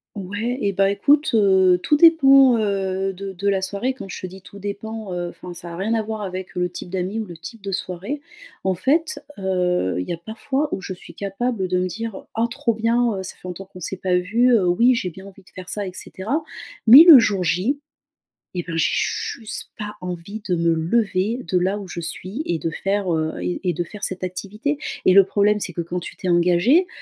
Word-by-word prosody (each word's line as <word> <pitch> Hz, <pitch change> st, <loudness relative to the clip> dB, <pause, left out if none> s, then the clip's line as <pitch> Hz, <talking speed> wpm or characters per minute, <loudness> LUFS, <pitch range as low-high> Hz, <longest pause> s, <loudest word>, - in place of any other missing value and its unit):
Ouais. 205 Hz, +6 st, -3 dB
Et 200 Hz, -, 0 dB
bah, 195 Hz, +1 st, +2 dB
écoute, 285 Hz, +9 st, +3 dB
heu, 190 Hz, -4 st, +4 dB
tout 295 Hz, -, +3 dB
dépend, 275 Hz, -6 st, +7 dB
heu, 195 Hz, -2 st, -1 dB
de 195 Hz, +1 st, -7 dB
de 195 Hz, +2 st, -2 dB
la 195 Hz, -1 st, +2 dB
soirée. 200 Hz, +7 st, -2 dB
Quand 255 Hz, -6 st, -9 dB
je -, -, -7 dB
te -, -, -5 dB
dis 190 Hz, +1 st, -12 dB
tout 200 Hz, +1 st, -13 dB
dépend, 205 Hz, +1 st, -5 dB
heu, 175 Hz, -1 st, -3 dB
enfin 180 Hz, 0 st, -10 dB
ça 170 Hz, 0 st, -8 dB
a -, -, -7 dB
rien 195 Hz, +5 st, -1 dB
à 225 Hz, -, +1 dB
voir 220 Hz, 0 st, -5 dB
avec 185 Hz, -1 st, -6 dB
le 180 Hz, 0 st, 0 dB
type 180 Hz, -, -8 dB
d'amis 185 Hz, +3 st, -3 dB
ou 220 Hz, -, -2 dB
le 175 Hz, -3 st, -9 dB
type 225 Hz, +7 st, -10 dB
de 195 Hz, 0 st, -5 dB
soirée. 190 Hz, +9 st, -4 dB, 0.4 s
En 190 Hz, -1 st, 0 dB
fait, 315 Hz, -, +1 dB, 0.2 s
heu, 180 Hz, -, 0 dB
il 90 Hz, -, -4 dB
y -, -, -1 dB
a -, -, -3 dB
parfois, 245 Hz, -, -3 dB
où -, -, -2 dB
je 190 Hz, -, -6 dB
suis 175 Hz, -2 st, -14 dB
capable 200 Hz, +2 st, -2 dB
de 180 Hz, 0 st, 0 dB
me 185 Hz, -, 0 dB
dire: 225 Hz, +1 st, -6 dB
«Ah 225 Hz, +1 st, +1 dB
trop 240 Hz, -1 st, -1 dB
bien, 230 Hz, 0 st, +1 dB
heu, 190 Hz, -, -5 dB
ça -, -, -7 dB
fait 185 Hz, -, -11 dB
longtemps 180 Hz, +2 st, -7 dB
qu'on 190 Hz, -1 st, -14 dB
s'est 190 Hz, -, -4 dB
pas 185 Hz, -1 st, 0 dB
vu, 225 Hz, +8 st, +2 dB
heu, 190 Hz, -6 st, +3 dB
oui, 235 Hz, +9 st, +4 dB
j'ai 185 Hz, -6 st, -2 dB
bien 190 Hz, +4 st, -12 dB
envie 195 Hz, 0 st, -14 dB
de 185 Hz, -, -20 dB
faire 185 Hz, -1 st, -10 dB
ça 205 Hz, -, -3 dB
et 185 Hz, -, -6 dB
cetera» 225 Hz, -, -4 dB, 0.4 s
mais 255 Hz, +7 st, +11 dB
le 330 Hz, -5 st, +10 dB
jour 205 Hz, -5 st, +2 dB
J, 185 Hz, -, 0 dB, 0.7 s
et 175 Hz, -1 st, -3 dB
bien, 165 Hz, -1 st, -5 dB
je 165 Hz, -, +3 dB
j'ai -, -, 0 dB, 0.5 s
juste 215 Hz, -, -5 dB
pas 210 Hz, 0 st, -6 dB
envie 180 Hz, +4 st, -6 dB
de 180 Hz, -, +3 dB
me 170 Hz, 0 st, +2 dB
lever 200 Hz, +6 st, 0 dB
de 180 Hz, +2 st, 0 dB
là 190 Hz, +3 st, 0 dB
où 200 Hz, -2 st, -8 dB
je 170 Hz, -, -5 dB
suis 185 Hz, -, -4 dB
et 170 Hz, -, 0 dB
de 165 Hz, +1 st, -2 dB
faire, 195 Hz, +2 st, -1 dB
heu 160 Hz, 0 st, -1 dB
et 90 Hz, 0 st, -2 dB
et -, -, +1 dB
de 175 Hz, -, -2 dB
faire 210 Hz, +4 st, -6 dB
cette 185 Hz, 0 st, -5 dB
activité. 200 Hz, +10 st, -3 dB, 0.3 s
Et, -, -, +5 dB
le 195 Hz, 0 st, +8 dB
problème 205 Hz, +2 st, +2 dB
c'est 180 Hz, -, -4 dB
que 170 Hz, -, -2 dB
quand 175 Hz, +2 st, -4 dB
tu 175 Hz, -, -9 dB
t'es 185 Hz, -, -4 dB
engagé, 180 Hz, -, +4 dB
195 Hz, 240 wpm, -22 LUFS, 180-225 Hz, 0.7 s, mais